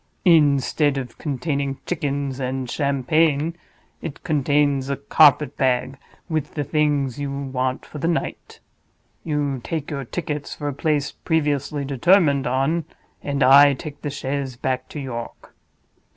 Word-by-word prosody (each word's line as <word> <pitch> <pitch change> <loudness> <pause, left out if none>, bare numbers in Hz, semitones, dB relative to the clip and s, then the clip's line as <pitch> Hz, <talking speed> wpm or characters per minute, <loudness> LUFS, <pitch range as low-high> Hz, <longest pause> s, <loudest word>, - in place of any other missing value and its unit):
Instead 145 -3 +4
of 130 -3 -6
containing 140 -1 -2
chickens 140 -5 -2
and 130 0 -3
Champagne, 150 +3 +1 0.5
it 160 -4 -7
contains 145 -2 +1
a 140 - -1
carpet 145 +1 +4
bag, 130 0 +1 0.3
with 155 -4 -3
the 145 - -1
things 145 -3 0
you 140 -1 -2
want 130 -2 -2
for 150 - -9
the 165 - -1
night. 170 -1 -3 0.6
You 145 -4 -1
take 155 +4 -4
your 140 -2 -3
tickets 150 +1 -4
for 145 - -5
a 145 - -2
place 150 0 0
previously 145 -3 -1
determined 145 0 +3
on, 135 +6 0 0.4
and 140 -1 -1
I 140 +2 +7
take 145 +2 -9
the 145 - -3
chaise 140 -2 -3
back 130 +3 -3
to 170 -6 -6
York. 120 -4 -7
140 Hz, 135 wpm, -22 LUFS, 135-150 Hz, 0.6 s, I